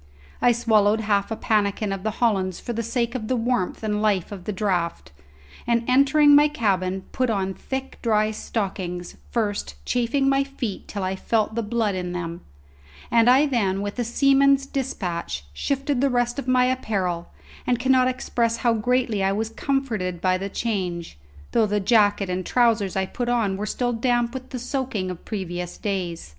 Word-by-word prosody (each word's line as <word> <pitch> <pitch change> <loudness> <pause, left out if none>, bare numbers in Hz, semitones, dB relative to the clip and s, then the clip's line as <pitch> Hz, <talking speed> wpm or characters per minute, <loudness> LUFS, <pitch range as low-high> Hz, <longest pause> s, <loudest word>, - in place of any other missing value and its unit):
I 245 - +5
swallowed 220 -2 +3
half 205 -2 +1
a 225 - -2
pannikin 210 -2 0
of 195 - -5
the 220 - -1
hollands 195 -6 +1
for 240 - -5
the 230 - -2
sake 235 +1 -1
of 230 -4 -4
the 255 - +1
warmth 235 -5 -1
and 210 -1 -1
life 205 -4 +1
of 190 -3 -8
the - - -2
draught, 185 -4 -2 0.6
and 235 0 +1
entering 280 +3 +5
my 295 +1 +7
cabin, 190 -9 -1
put 255 -1 0
on 195 -3 -1
thick 265 +6 -6
dry 215 -2 +2
stockings, 190 -5 -4
first, 205 - -2
chafing 250 +3 +1
my 275 0 +3
feet 265 -7 -5
till 200 -2 -4
I 185 +1 -1
felt 220 +2 0
the 230 - -1
blood 220 -1 0
in 180 -1 -3
them; 170 -1 -5 0.7
and 230 +1 +5
I 265 +4 +6
then, 200 -8 0
with 205 +4 -5
a - - +2
seaman's 275 +3 +4
dispatch, 180 - -3
shifted 275 - -1
the 280 - +3
rest 245 +1 0
of 275 - -6
my 255 0 +4
apparel, 195 -9 -1 0.4
and 245 - +2
cannot 255 +1 +3
express 235 -2 0
how 235 0 +2
greatly 235 -1 +1
I 195 - +2
was 215 +2 -1
comforted 225 -10 -2
by 185 +1 +2
the 195 +1 -4
change, 180 - -3 0.3
though 225 -2 +3
the 210 0 0
jacket 205 -1 +3
and 180 0 -2
trousers 225 -4 +2
I 190 0 +1
put 240 +5 -3
on 225 -5 +1
were 210 +2 -4
still 245 +2 -1
damp 240 0 +1
with 260 -1 -7
the 255 - -5
soaking 250 -7 -2
of 180 - -10
previous 180 -4 -4
days. 180 - -3
220 Hz, 180 wpm, -24 LUFS, 190-250 Hz, 0.7 s, my